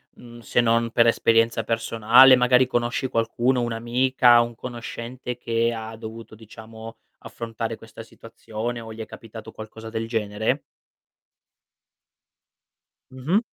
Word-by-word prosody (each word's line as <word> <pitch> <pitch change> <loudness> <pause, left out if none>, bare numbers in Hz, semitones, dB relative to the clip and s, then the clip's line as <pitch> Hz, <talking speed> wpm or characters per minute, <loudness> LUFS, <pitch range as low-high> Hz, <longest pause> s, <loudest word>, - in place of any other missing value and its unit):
mhmm, 120 -1 -13
se 120 - -1
non 115 0 +2
per 115 0 +4
esperienza 115 0 +2
personale, 115 +3 +5
magari 125 +1 +4
conosci 120 +1 -1
qualcuno, 120 +2 0
un'amica, 120 +1 +3
un 120 0 -4
conoscente 120 +1 -7
che 115 -1 0
ha 110 0 -7
dovuto 110 0 -10
diciamo 110 +1 -12 0.2
affrontare 115 -1 -6
questa 115 0 -12
situazione 115 +1 -7
o 115 0 -9
gli 110 - -13
è 110 - -5
capitato 110 0 -11
qualcosa 110 +1 -10
del 110 0 -4
genere? 110 +3 -1 2.5
Mh-mh. 135 +10 0
115 Hz, 120 wpm, -23 LUFS, 115-120 Hz, 2.5 s, personale